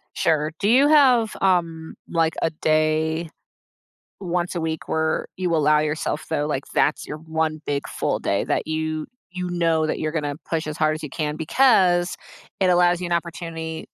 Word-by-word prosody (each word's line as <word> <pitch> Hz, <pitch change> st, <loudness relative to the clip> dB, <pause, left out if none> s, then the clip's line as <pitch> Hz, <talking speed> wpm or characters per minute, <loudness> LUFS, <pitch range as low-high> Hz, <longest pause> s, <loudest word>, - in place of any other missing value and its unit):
Sure. 155 Hz, -1 st, +1 dB
Do 205 Hz, -, +1 dB
you 270 Hz, +4 st, +5 dB
have, 255 Hz, -7 st, +4 dB
um, 170 Hz, -4 st, 0 dB
like 165 Hz, -1 st, +1 dB
a -, -, +2 dB
day 155 Hz, +1 st, 0 dB, 0.9 s
once 180 Hz, -1 st, -2 dB
a 170 Hz, -, -2 dB
week 160 Hz, 0 st, -3 dB
where 160 Hz, 0 st, 0 dB
you 180 Hz, -3 st, 0 dB
allow 150 Hz, 0 st, +4 dB
yourself 150 Hz, 0 st, -2 dB
though, 145 Hz, -, -1 dB
like 140 Hz, -2 st, -2 dB
that's 150 Hz, -, +1 dB
your 150 Hz, -, -6 dB
one 160 Hz, -1 st, -2 dB
big 140 Hz, -1 st, -2 dB
full -, -, -1 dB
day -, -, 0 dB
that -, -, -1 dB
you 155 Hz, 0 st, -2 dB, 0.3 s
you 180 Hz, 0 st, -4 dB
know 165 Hz, -2 st, +1 dB
that -, -, -2 dB
you're 155 Hz, 0 st, -2 dB
gonna 145 Hz, -3 st, -2 dB
push 165 Hz, -1 st, -1 dB
as 155 Hz, -1 st, -5 dB
hard 155 Hz, 0 st, +2 dB
as 155 Hz, -, -8 dB
you 150 Hz, -, -5 dB
can 150 Hz, +1 st, -3 dB
because 175 Hz, -, +3 dB, 0.5 s
it 185 Hz, -, +4 dB
allows 175 Hz, 0 st, +4 dB
you -, -, -2 dB
an 175 Hz, -, -5 dB
opportunity 165 Hz, -1 st, -4 dB
160 Hz, 180 wpm, -23 LUFS, 155-175 Hz, 0.9 s, you